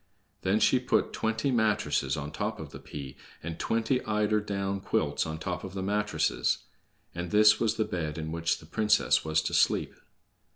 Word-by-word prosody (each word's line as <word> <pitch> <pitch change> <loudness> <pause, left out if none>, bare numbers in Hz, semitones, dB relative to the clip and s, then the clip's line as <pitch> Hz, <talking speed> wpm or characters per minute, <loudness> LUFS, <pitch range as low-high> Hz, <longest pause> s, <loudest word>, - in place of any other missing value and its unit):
Then 100 +3 +2
she 125 +4 +4
put 125 - +1
twenty 110 +4 0
mattresses 105 - +1
on 75 0 -5
top - - -3
of - - -8
the - - -9
pea 70 -2 -8 0.3
and 80 0 -5
twenty 115 +3 0
eider 105 0 +1
down 100 -1 -2
quilts - - 0
on 80 - -4
the 80 - -8
top 90 -2 -3
of 95 0 -7
the 95 - -3
mattresses. 105 -5 0 0.5
And 85 +1 -4
this 105 +2 +6
was 110 -2 +1
the 110 - 0
bed 80 -6 -3
in 80 0 -4
which 85 0 0
the - - -14
princess 105 +6 +2
was 80 0 +1
to - - -3
sleep. - - +2
100 Hz, 190 wpm, -29 LUFS, 80-110 Hz, 0.5 s, this